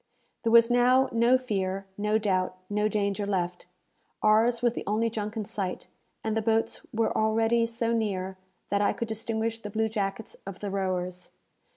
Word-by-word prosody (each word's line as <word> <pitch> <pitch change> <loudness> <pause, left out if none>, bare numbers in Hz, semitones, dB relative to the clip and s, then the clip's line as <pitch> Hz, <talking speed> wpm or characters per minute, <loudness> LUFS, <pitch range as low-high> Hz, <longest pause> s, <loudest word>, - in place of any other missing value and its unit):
There 230 - 0
was 230 +1 +7
now 250 +2 +4
no 235 +2 +4
fear, 195 -6 -2
no 210 +1 +1
doubt, 185 -3 0
no 210 +1 +2
danger 205 -1 -1
left! 180 -2 -2 0.6
Ours 230 +3 +4
was 240 -1 +3
the - - -4
only 220 +2 +1
junk 215 0 -4
in 215 - -2
sight, 195 -4 -4 0.4
and 220 -1 -1
the 225 - +1
boats 225 +1 0
were 225 0 0
already 225 +2 +2
so 230 0 -1
near, 190 -4 -1 0.3
that 200 +1 +1
I 205 - +3
could 235 - -4
distinguish 225 +1 -2
the 210 - -7
blue 220 +1 0
jackets 205 0 -3
of 195 -1 -7
the 205 -2 -4
rowers. 185 -2 -2
215 Hz, 175 wpm, -28 LUFS, 195-230 Hz, 0.6 s, was